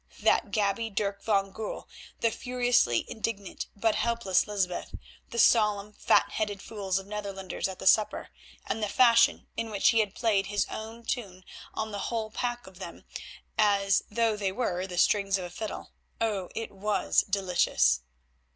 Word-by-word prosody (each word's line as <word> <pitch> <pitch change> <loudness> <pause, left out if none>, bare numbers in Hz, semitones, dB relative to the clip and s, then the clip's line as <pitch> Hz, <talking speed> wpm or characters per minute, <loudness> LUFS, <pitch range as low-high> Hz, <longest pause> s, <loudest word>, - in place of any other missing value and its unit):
That - - +3
gaby, 205 +2 0
Dirk 200 -1 -2
van 195 -2 +1
Goorl; 220 +1 -6 0.3
the 230 - +3
furiously 245 - +1
indignant 210 -3 -4
but 220 +2 +2
helpless 220 -4 +1
Lysbeth; 190 -4 -2 0.3
the 235 - -7
solemn, 210 -3 +4
fat - - +3
headed 205 -2 -2
fools 195 -3 -3
of 195 - -5
Netherlanders 200 -3 -4
at 190 -1 -7
the - - -8
supper, 215 +2 +3 0.4
and 225 - -3
the 210 - 0
fashion 235 0 +5
in 230 - -3
which 205 -2 +3
he 230 - +3
had 210 -2 0
played 215 -5 +1
his 205 0 0
own 225 +2 -7
tune 190 -8 -4 0.3
on 220 0 -3
the 205 - -4
whole 225 -2 -2
pack 240 +1 -3
of 190 -1 -14
them - - -9 0.5
as 200 -2 +4
though 225 0 +1
they 200 -2 -1
were 190 -4 -2
the 180 -2 -7
strings 195 +1 +3
of 185 - -5
a 175 - -8
fiddle—oh! 210 0 -5
it 225 0 -4
was 205 +1 +1
delicious. 190 - +2
210 Hz, 160 wpm, -28 LUFS, 195-225 Hz, 0.5 s, fashion